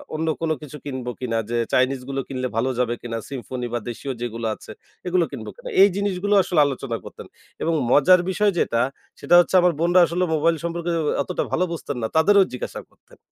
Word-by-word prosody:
অন্য 160 +1 -2
কোনো 160 -1 +1
কিছু 150 -1 -9
কিনবো 130 -3 -4
কিনা, 115 -3 -2
যে 120 - -1 0.2
চাইনিজগুলো 130 +1 0
কিনলে 130 -1 -3
ভালো 120 +3 +1
যাবে 120 -1 +1
কিনা, 115 -1 -4
Symphony 125 -2 -5
বা 120 - 0
দেশীয় 125 +3 -5
যেগুলো 115 -1 -4
আছে, - - -12 0.4
এগুলো 180 -1 +2
কিনব - - -7
কিনা। - - -9
এই 200 - +8
জিনিসগুলো 200 0 -1
আসলে 175 -4 0
আলোচনা 135 -4 -3
করতেন। - - -11 0.3
এবং 165 - +1 0.2
মজার 180 +7 +6
বিষয় 205 +2 +2
যেটা, 115 - +1 0.4
সেটা 175 - +3
হচ্ছে 175 - +2
আমার 175 -1 +3
বোনরা 175 +2 +4
আসলে 170 +2 -1
মোবাইল 165 +2 +2
সম্পর্কে 170 0 -2 0.3
অতটা 180 - -2
ভালো 180 - +1
বুঝতেন 145 -4 -5
না। 110 - 0
তাদেরও 200 +5 +5
জিজ্ঞাসা 125 - -5
করতেন। - - -24
150 Hz, 190 wpm, -23 LUFS, 125-180 Hz, 0.4 s, এই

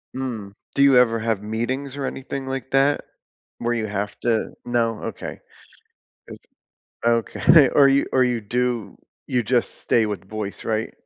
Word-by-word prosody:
Mm, 115 -7 -5 0.2
do - - +2
you 140 -1 +6
ever 115 -2 +4
have 110 -2 -1
meetings 130 +6 -3
or 140 - -2
anything 135 0 -5
like 135 0 -5
that? 135 +2 +3 0.6
Where 120 0 0
you 110 -2 -2
have 100 0 -4
to 115 -2 0
No? 115 -2 0
Okay. - - -6 0.9
Is - - -9 0.7
Okay, 115 - +5
or 140 -1 +6
you 135 +1 +3
or 130 - +4
you 120 -2 0
do 120 +1 -2 0.3
you 125 -2 0
just 120 +2 0
stay 115 - +2
with 105 -4 -4
voice, 105 -1 -5
right? 110 0 -1
120 Hz, 155 wpm, -23 LUFS, 110-130 Hz, 0.9 s, you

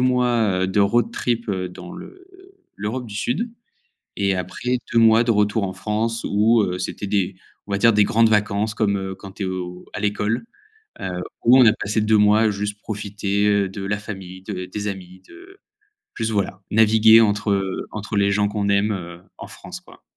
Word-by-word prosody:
mois, 120 -6 +2
heu, - - 0
de 95 +2 +1
road 110 +4 +2
trip 120 -2 -2
heu, 95 -2 -2
dans 175 - -10
l'E 370 - -12 0.5
l'Europe 115 +5 -4
du 105 - -9
Sud 155 - -2 0.7
et 100 -2 +1
après 125 +8 -2 0.2
2 115 - +5
mois 115 +1 +6
de 115 - +3
retour 105 0 +1
en 95 - -5
France 115 +2 -2
où 110 +3 +3
heu, 90 -1 -2
c'était 100 +2 -4
des, 95 -2 0 0.3
on 100 - -8
va - - +2
dire, 115 +2 +4
des 105 - +5
grandes 115 +2 +3
vacances 105 0 +1
comme, 100 -3 0
heu, 95 0 -5
quand 95 0 -11
tu 100 - -5
es - - -1
au 90 -1 -5
à - - -4
l'école, 105 - -1 0.6
heu, 90 -1 -4 0.2
où 125 +3 +7
on 125 - +7
a 110 - +7
passé 105 +2 -2
2 110 0 +3
mois 105 +1 +4
juste 105 0 -4
profiter, 100 -1 -2
heu, 100 -2 +2
de 95 0 -7
la 105 +1 -1
famille, 95 -3 -9
de 95 -2 -5
des 105 +3 -4
amis, 95 -1 -8
de 385 +2 -15 0.6
juste 115 -1 -1
voilà, 95 -2 -2
naviguer 110 +1 +6
entre, 105 0 +1
heu, 95 -1 -2
entre 105 0 -5
les 100 0 +3
gens 105 0 +2
qu'on 100 -1 -2
aime, 100 +2 +2
heu, 85 -3 -7 0.2
en - - -8
France, - - -10
quoi - - -18
105 Hz, 200 wpm, -22 LUFS, 100-110 Hz, 0.7 s, où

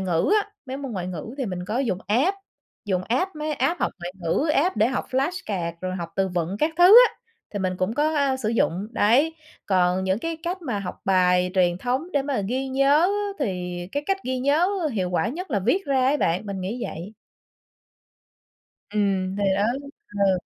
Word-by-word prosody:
ngữ 180 - +1
á, 415 - -15 0.2
mấy 260 - -4
môn 275 -4 -6
ngoại 180 -3 -3
ngữ 185 - -6
thì 265 - -1
mình 180 -2 -4
có 215 +7 -2
dùng 225 -9 0
app, 275 - +2 0.5
dùng 185 -3 0
app, 305 +9 0
mấy 305 0 -2
app 345 +4 0
học - - 0
ngoại 175 +1 -6
ngữ, 175 - 0
app 330 -1 +2
để 215 +1 +4
học 255 - -2
flashcard 255 - -1
rồi 185 0 -3
học 170 -2 -5
từ 190 -1 +1
vựng 180 +2 -2
các 305 +6 +2
thứ 350 - +6 0.2
á, - - -17 0.4
thì 205 - -4
mình 185 -1 -1
cũng 185 +5 -1
có, 305 +3 +1
a, 275 -2 +2
sử 225 -5 -2
dụng, 205 -3 0
đấy. 265 +11 +3 0.3
Còn 185 -1 +2
những 190 +2 +1
cái 330 +4 -3
cách 360 +1 -3
mà 240 -9 -2
học 185 -2 -6
bài 180 -1 +3
truyền 175 -1 +2
thống 260 - -2
để 280 - +2
mà 275 -5 -1
ghi 265 +2 -2
nhớ 275 +6 +4 0.3
thì 180 -8 -3
cái 285 - -1
cách 390 0 +2
ghi 255 0 -1
nhớ 290 +8 +2 0.2
hiệu 185 -4 -1
quả 200 +4 +1
nhất 345 +7 -6
là 215 - +1
viết 335 - +1
ra 270 -2 +2
ấy 290 +2 +3
bạn, 180 -3 0
mình 195 -2 -4
nghĩ 220 +7 -4
vậy. 180 +7 -7 1.8
Ừm, 195 -2 0
thì 205 - -1
đó, 200 - +1 0.4
ừ. 200 -2 +1
215 Hz, 205 wpm, -24 LUFS, 185-280 Hz, 1.8 s, thứ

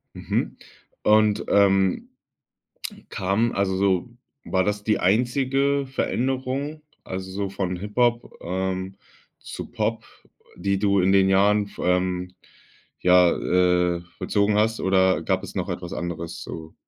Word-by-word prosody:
Mhm, - - -2 0.5
und, 105 -1 +3
ähm, 95 -2 +3 1.0
kam 100 +5 0
also, 100 -1 0
so 95 +3 +1 0.4
war 95 -1 +1
das 105 +1 -2
die 110 - +2
einzige 135 +7 +1
Veränderung? 135 +3 -2 0.2
Also 95 0 -6
so 100 +1 -3
von 95 -2 -3
Hip-Hop, 120 +5 0
ähm, 95 +1 -3 0.4
zu - - -8
Pop, 115 -1 -2 0.5
die 100 -1 -1
du 100 -1 +2
in 95 +2 +3
den 95 -1 +4
Jahren, 100 +1 +3
ähm, 90 0 0 0.7
ja, 90 -1 +5
äh, 90 -1 +1 0.2
vollzogen 105 0 +1
hast 110 +1 +1
oder 95 -3 +3
gab 95 +2 0
es - - -9
noch 95 0 -2
etwas 90 -1 -5
anderes 85 -1 -5
so? 80 0 -8
95 Hz, 125 wpm, -24 LUFS, 90-110 Hz, 1.0 s, ja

